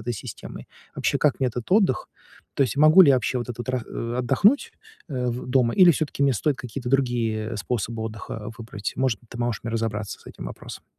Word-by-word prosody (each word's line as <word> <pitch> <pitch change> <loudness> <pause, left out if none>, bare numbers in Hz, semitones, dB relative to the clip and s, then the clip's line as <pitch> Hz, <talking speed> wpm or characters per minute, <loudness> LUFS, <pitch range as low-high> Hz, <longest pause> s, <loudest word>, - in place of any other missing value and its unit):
этой 120 - 0
системой? - - -9 0.3
Вообще, - - 0
как 150 -2 +2
мне 130 - +2
этот 120 -1 -6
отдых? 190 - +3 0.5
То - - +3
есть 130 -1 -1
могу 155 +5 +7
ли 165 - +6
я 135 - +6
вообще 125 0 -1
вот 120 -1 -5
этот 120 +2 -7
ра 130 -2 -1
э, 115 +1 -4
отдохнуть, 140 - +3 0.4
э, 125 -4 -2
в 120 +1 -5
дома 125 -2 +2
или 180 -2 +7
всё-таки 145 -2 -2
мне 140 -2 +3
стоит 145 +5 0
какие-то 125 +1 -5
другие 120 -4 0
способы 110 +3 -3
отдыха 110 0 -6
выбрать? 110 -3 -5
Может 130 -5 +1
быть, 120 - -25
ты 120 - -8
можешь 120 -2 -2
мне 115 - -3
разобраться 110 -2 -3
с - - -22
этим - - -9
вопросом? - - -9
120 Hz, 215 wpm, -24 LUFS, 115-135 Hz, 0.5 s, могу